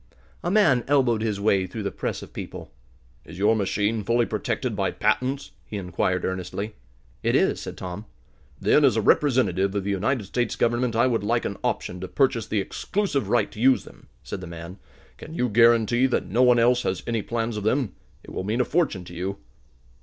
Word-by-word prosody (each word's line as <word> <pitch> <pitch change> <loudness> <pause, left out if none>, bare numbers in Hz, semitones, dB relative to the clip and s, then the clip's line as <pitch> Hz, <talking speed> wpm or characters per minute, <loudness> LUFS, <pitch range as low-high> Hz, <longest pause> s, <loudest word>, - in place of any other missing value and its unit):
A 175 - 0
man 170 - +4
elbowed 130 -6 +3
his 105 -3 -1
way 100 -2 +2
through 105 +4 -6
the 100 - -2
press - - -4
of - - -13
people. - - -8 0.5
"Is 85 - -11
your 105 +3 +3
machine 105 +1 0
fully 120 +3 +2
protected - - -2
by - - 0
patents?" 135 +2 -1
he 105 - -6
inquired 90 0 -1
earnestly. 95 +3 -4 0.5
"It - - +1
is," - - +2
said - - -7
Tom. 90 +3 -6 0.5
"Then, 105 +9 +4
as 130 -6 +5
a - - +2
representative 100 -10 +2
of 100 - 0
the 100 - -1
United 110 +5 0
States 120 +4 -2
Government, 120 0 +1
I 115 - +4
would 115 -5 +1
like 115 +3 0
an 100 - -3
option 90 - -2
to 95 - -5
purchase 125 -4 +1
the 110 - 0
exclusive 140 - -2
right 115 -2 +2
to - - -11
use 130 +1 +4
them," - - -16 0.2
said 95 - -6
the 90 - -7
man. 85 +3 -9 0.4
"Can 160 - -10
you 125 - +1
guarantee 115 +2 +4
that 125 - 0
no 105 +8 +1
one 125 -1 +6
else 120 +1 +4
has 95 - -2
any 115 -2 -1
plans 115 +1 -2
of 105 - -4
them? 110 -2 +1 0.3
It - - -12
will - - -4
mean 110 +5 -1
a - - +1
fortune 150 - 0
to 85 - -11
you." 95 +3 -4
110 Hz, 205 wpm, -25 LUFS, 100-125 Hz, 0.5 s, one